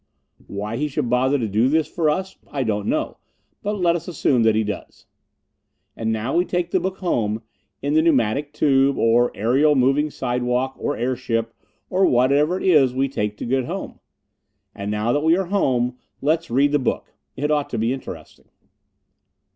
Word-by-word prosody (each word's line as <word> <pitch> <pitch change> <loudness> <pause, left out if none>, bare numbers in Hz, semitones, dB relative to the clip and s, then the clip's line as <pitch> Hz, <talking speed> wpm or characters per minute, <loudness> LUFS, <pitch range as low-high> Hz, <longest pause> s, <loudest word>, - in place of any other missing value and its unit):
Why 105 +3 -4
he 150 +3 0
should 125 -4 -2
bother 130 +3 +2
to 115 -5 -2
do 110 +5 +2
this 160 +1 +2
for 160 -3 0
us 190 +5 -2
I 140 -2 -2
don't 105 -3 -2
know; - - -1 0.4
but 210 - -2
let 175 -3 +2
us 170 -1 -5
assume 140 -7 +1
that 110 -1 +4
he 110 - +2
does. 105 -2 -7 0.9
And 110 0 -2
now 110 +4 -2
we 175 - +4
take 175 -1 -2
the 185 - +2
book 190 +2 -3
home 110 - -1 0.4
in 145 +1 0
the 155 - +5
pneumatic 145 -2 +1
tube, 140 -2 +2
or 120 +2 +3
aerial 135 +8 +3
moving 135 +3 +2
sidewalk, 125 0 -1
or 145 - -2
airship, 115 -2 -2 0.3
or 190 +1 +2
whatever 140 +8 +3
it - - -6
is 140 -9 +4
we 135 +1 +1
take 105 -5 -3
to - - -5
get 130 +1 0
home. - - -6 0.7
And 100 +1 -5
now 105 +2 0
that 145 - +2
we 165 +2 +4
are 190 - -1
home, 125 -10 0 0.2
let's 160 +3 0
read 140 +4 +3
the 145 - +2
book. 125 - -3 0.2
It 150 +2 -1
ought 145 -1 0
to - - -3
be 115 +3 +1
interesting. 135 - -10
135 Hz, 185 wpm, -22 LUFS, 115-150 Hz, 0.9 s, the